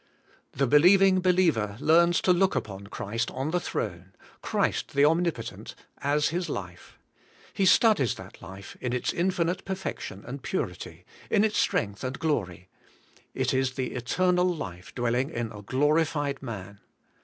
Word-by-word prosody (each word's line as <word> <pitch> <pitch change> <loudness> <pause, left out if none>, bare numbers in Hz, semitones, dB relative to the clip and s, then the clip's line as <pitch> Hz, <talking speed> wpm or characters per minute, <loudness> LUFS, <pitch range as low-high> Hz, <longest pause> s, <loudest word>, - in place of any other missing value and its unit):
The 140 - +1
believing 185 +7 +6
believer 165 - +2
learns 170 +3 +4
to 180 - +4
look 190 +2 +2
upon 100 -1 -4
Christ 115 +3 -3
on 135 +4 -3
the 180 - +1
throne, - - -5 0.3
Christ - - -1
the 140 +1 +5
Omnipotent, 165 -6 -1 0.2
as 145 +1 +1
his 175 +3 -2
life. 90 -3 -7 0.6
He 195 - +2
studies 195 - +4
that 95 0 -12
life 95 +1 -10
in 125 -1 -2
its 125 - -1
infinite 180 0 0
perfection 190 0 -5
and - - -7
purity, - - -4 0.2
in 210 - +3
its 215 -1 +1
strength 100 -2 0
and 130 +1 -3
glory; 90 - -2 0.7
it - - 0
is 130 -1 +1
the 130 -1 -3
eternal 180 +9 +1
life 95 - -6
dwelling 120 +3 0
in 115 -5 -4
a 105 - -9
glorified 145 +3 0
man. 100 -5 -7
140 Hz, 145 wpm, -27 LUFS, 115-175 Hz, 0.7 s, believing